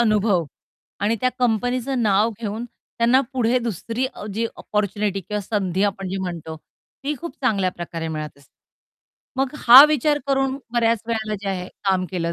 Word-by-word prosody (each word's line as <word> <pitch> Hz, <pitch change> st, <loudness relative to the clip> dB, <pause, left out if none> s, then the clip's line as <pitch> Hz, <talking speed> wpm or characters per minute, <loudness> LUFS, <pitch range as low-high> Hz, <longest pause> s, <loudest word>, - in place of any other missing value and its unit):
अनुभव 210 Hz, -5 st, +2 dB, 0.6 s
आणि 215 Hz, +3 st, +1 dB
त्या 255 Hz, -, +2 dB
कंपनीच 245 Hz, +1 st, 0 dB
नाव 225 Hz, -4 st, +2 dB
घेऊन 220 Hz, +2 st, -4 dB
त्यांना, 240 Hz, +2 st, 0 dB
पुढे 250 Hz, -1 st, +2 dB
दुसरी 230 Hz, +2 st, -3 dB
अ, 210 Hz, -, -8 dB
जी 230 Hz, +1 st, 0 dB
अपॉर्च्युनिटी 205 Hz, -1 st, -1 dB
किंवा 210 Hz, +3 st, -4 dB
संधी 195 Hz, -2 st, -1 dB
आपण 195 Hz, -1 st, -2 dB
जी 190 Hz, -, -3 dB
म्हणतो 165 Hz, -3 st, -5 dB, 0.5 s
ती 295 Hz, -, -1 dB
खूप 335 Hz, -5 st, -6 dB
चांगल्या 200 Hz, -7 st, +2 dB
प्रकारे 165 Hz, -1 st, -5 dB
मिळत 155 Hz, -2 st, -5 dB
असते. 140 Hz, -, -24 dB, 0.8 s
मग 270 Hz, 0 st, +1 dB
हा 260 Hz, +4 st, +10 dB
विचार 300 Hz, 0 st, +2 dB
करून 270 Hz, -1 st, +1 dB
बऱ्याच 230 Hz, -2 st, +2 dB
वेळेला 220 Hz, -2 st, -2 dB
जे 200 Hz, -, -4 dB
आहे 185 Hz, -1 st, -3 dB, 0.2 s
काम 190 Hz, -1 st, +2 dB
केलं 170 Hz, -2 st, -2 dB
215 Hz, 160 wpm, -22 LUFS, 190-245 Hz, 0.8 s, हा